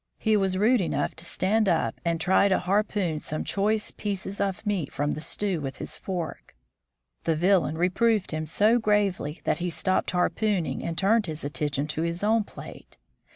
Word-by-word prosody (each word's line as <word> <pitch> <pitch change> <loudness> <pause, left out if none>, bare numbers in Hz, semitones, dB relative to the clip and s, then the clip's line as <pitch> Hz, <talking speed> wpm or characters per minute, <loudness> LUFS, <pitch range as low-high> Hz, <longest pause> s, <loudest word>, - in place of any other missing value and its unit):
He 220 -1 +2
was 190 -2 +1
rude 225 +4 +4
enough 145 -5 -1
to 160 - -6
stand 205 +4 +1
up 160 -10 0
and 170 -1 0
try 190 +4 +4
to 190 - +3
harpoon 190 -3 0
some 155 0 -3
choice 210 +2 0
pieces 200 -1 -4
of 195 +1 -2
meat 195 -9 -1
from 145 +1 -1
the 155 - -4
stew 190 0 -1
with 135 -1 -4
his - - -5
fork. 180 - -5 0.7
The 165 - +2
Villain 175 -2 +2
reproved 195 +4 +2
him 155 0 -3
so 215 +9 +3
gravely 200 -7 0
that 150 - 0
he 175 0 -1
stopped 185 +3 0
harpoon 185 +1 +1
ing - - -4
and 165 -1 -4
turned 215 +2 +3
his 155 0 -5
attention 145 0 -1
to 155 - -2
his 170 +3 -2
own 220 0 +3
plate. - - -12
185 Hz, 185 wpm, -26 LUFS, 160-205 Hz, 0.7 s, rude